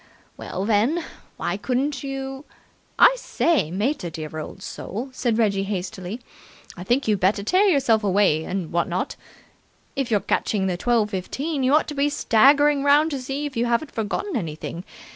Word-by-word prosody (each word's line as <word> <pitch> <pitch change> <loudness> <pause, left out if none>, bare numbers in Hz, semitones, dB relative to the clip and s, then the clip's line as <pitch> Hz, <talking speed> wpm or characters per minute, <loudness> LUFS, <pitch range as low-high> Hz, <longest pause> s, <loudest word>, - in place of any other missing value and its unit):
Well, 190 +2 -5
then, 230 +11 +2 0.3
why - - -2
couldn't 260 +5 -1
you 270 0 -5 0.3
?" - - -38
"I - - +7
say, 320 - +1
mater, 205 - -1
dear 155 -1 -7
old 155 - -8
soul," 235 +8 -6
said 240 -3 -1
Reggie 205 -4 +2
hastily, 195 +2 -5 0.5
"I 180 - -8
think 245 +7 +1
you'd 210 -3 +2
better 195 +2 +2
tear 370 - +3
yourself 265 - +3
away 195 -5 +3
and 180 -1 -4
what 170 0 +1
not. 185 +11 -2 0.8
If 270 -3 -1
you're 210 -3 +3
catching 200 -3 0
the 185 -2 0
twelve 220 +2 +1
fifteen, 275 - -3
you 260 +3 +4
ought 310 - +2
to 300 - -4
be 285 0 +1
staggering 285 +3 +4
round 295 +3 +4
to 275 -3 -3
see 275 +3 -3
you 235 0 0
haven't 240 +6 0
forgotten 225 - -3
anything. 170 -2 -5
230 Hz, 170 wpm, -23 LUFS, 195-280 Hz, 0.8 s, I